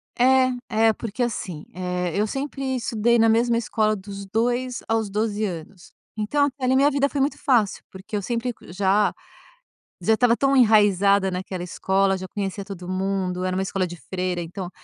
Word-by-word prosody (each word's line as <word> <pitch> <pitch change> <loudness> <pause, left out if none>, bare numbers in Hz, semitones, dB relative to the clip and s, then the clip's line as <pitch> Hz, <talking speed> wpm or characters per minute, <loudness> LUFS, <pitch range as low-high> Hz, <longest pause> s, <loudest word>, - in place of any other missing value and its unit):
É, 260 +1 +4 0.4
é, - - +3
porque 225 +3 -3
assim, 185 -9 -4
eh, 180 0 -2
eu 210 +2 +1
sempre 270 +1 -3
estudei 235 -1 +1
na 225 0 +5
mesma 230 +1 +3
escola 215 -2 +1
dos 200 0 -8
2 240 +4 -1
aos 225 -2 0
12 210 +1 -1
anos. 175 -1 -6 0.2
Então 225 +7 +1
até 280 -1 -5
ali 255 +1 +3
minha 280 +2 +4
vida 280 0 +1
foi 285 - -3
muito 275 +2 +1
fácil, 235 -8 +1
porque 190 +3 -8
eu 205 - 0
sempre 240 +4 -2
já 195 +3 +2 0.9
já 220 - +4
estava 235 +1 +4
tão 275 +2 +2
enraizada 200 -4 +4
naquela 185 0 -4
escola, 190 +2 +1
já 185 0 -6
conhecia 195 +1 -4
todo 190 -3 -8
mundo, 185 -1 -1
era 185 0 -1
uma 190 - 0
escola 190 -1 -1
de 175 0 -8
freira, 180 +5 -3
então 175 +2 -6
210 Hz, 180 wpm, -23 LUFS, 190-240 Hz, 0.9 s, na